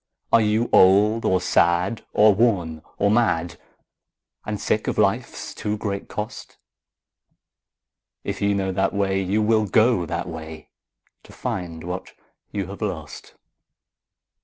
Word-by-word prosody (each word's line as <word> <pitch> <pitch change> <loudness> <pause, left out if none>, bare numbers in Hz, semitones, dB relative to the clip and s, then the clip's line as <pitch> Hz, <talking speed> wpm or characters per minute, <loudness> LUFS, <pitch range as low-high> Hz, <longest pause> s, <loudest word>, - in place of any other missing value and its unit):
Are 115 - +7
you 110 +2 +1
old 105 +4 +5
or 95 - +3
sad 90 +3 +1
or 105 0 +5
worn 95 -8 +1 0.2
or 100 0 +2
mad, 95 -7 +1 0.9
And - - -3
sick - - -1
of - - -1
life's - - -1
too 105 0 -3
great 100 -2 -4
cost? 105 0 -7 1.7
If - - -4
you 100 0 +2
know 95 -1 -1
that 95 +2 0
way, 95 -1 +1
you 100 +3 0
will 110 -1 +2
go 110 -2 +3
that - - -3
way, 80 -2 -9 0.5
To - - -17
find 85 -3 -5
what 90 +2 -6 0.4
you 100 -2 -3
have 100 +4 -9
lost. 80 -8 -6
100 Hz, 135 wpm, -23 LUFS, 90-105 Hz, 1.7 s, Are